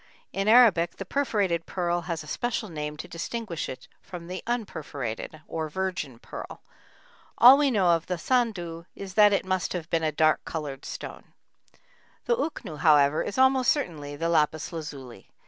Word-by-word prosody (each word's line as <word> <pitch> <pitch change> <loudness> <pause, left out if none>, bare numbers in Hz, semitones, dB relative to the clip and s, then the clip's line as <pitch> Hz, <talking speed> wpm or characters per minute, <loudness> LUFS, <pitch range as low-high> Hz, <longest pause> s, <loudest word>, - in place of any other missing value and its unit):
In 195 +1 -1
Arabic 215 -8 +5
the 195 - -6
perforated 200 - 0
pearl 175 -1 -1
has 165 -2 -2
a - - -13
special 235 +4 -2
name 150 -2 -5
to - - -7
distinguish 170 +1 -4
it 130 - -8
from 175 -3 -9
the 180 +2 -6
unperforated, 155 - -4
or 160 -1 -3
"virgin 180 -7 -3
pearl." - - -9 0.7
All 250 +3 +10
we 285 0 +3
know 200 -8 +2
of 165 -1 +1
the 180 - -1
sându 175 -6 -1
is 195 -2 -8
that 210 +1 +6
it 200 - +1
must 185 -1 -1
have 175 -2 -5
been 165 - +2
a 155 -1 0
dark 155 +1 +2
colored 145 -4 -6
stone. - - -8 0.9
The 480 - +2
uknû, 230 - -4
however, 145 -1 +4
is 205 - -4
almost 260 -1 +4
certainly 150 - -1
the 165 +3 -2
lapis 155 -1 +1
lazuli. 140 -6 -8
170 Hz, 165 wpm, -26 LUFS, 155-210 Hz, 0.9 s, All